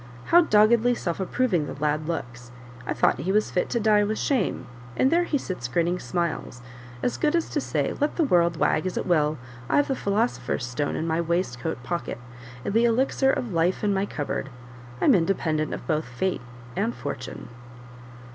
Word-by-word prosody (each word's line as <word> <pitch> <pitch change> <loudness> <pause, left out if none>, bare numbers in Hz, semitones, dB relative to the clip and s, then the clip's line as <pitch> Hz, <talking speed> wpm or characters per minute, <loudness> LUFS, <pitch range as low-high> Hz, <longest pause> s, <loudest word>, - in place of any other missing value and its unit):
How 345 - +9
doggedly 235 -3 +4
self 170 -6 -3
approving 190 -5 0
the - - -6
lad 150 +1 0
looks! 120 -7 -5 0.4
I - - 0
thought - - +2
he 190 - -1
was 210 +2 +1
fit 180 - 0
to 235 - 0
die 210 -1 +4
with 215 +1 -1
shame, 235 - 0 0.3
and 265 - +3
there 345 +1 +3
he 300 - 0
sits 180 - -5
grinning 170 +7 0
smiles, 170 -9 -3 0.4
as 245 - 0
good 300 +1 +1
as 335 - +1
to - - 0
say, - - -1
'Let 295 +1 -1
the 335 - +2
world 170 - +3
wag 155 +3 +1
as 185 - -4
it - - -1
will, 155 -4 +2 0.3
I've 290 - +3
the 270 - +1
philosopher's 205 - -1
stone 125 +4 -2
in 160 - -2
my 165 0 0
waist 170 -7 -1
coat 120 +1 -4
pocket, 170 +7 -3 0.5
and - - -2
the 230 +2 +4
elixir 265 +3 +2
of 235 -7 -3
life 170 +4 +1
in 205 -1 +2
my 195 +1 0
cupboard; 145 -4 -3 0.5
I'm 275 - +5
independent 165 -4 +1
of - - -5
both 155 -1 0
Fate 125 +9 -2 0.3
and 225 +4 -1
Fortune. 135 -4 -6
180 Hz, 190 wpm, -25 LUFS, 155-230 Hz, 0.5 s, How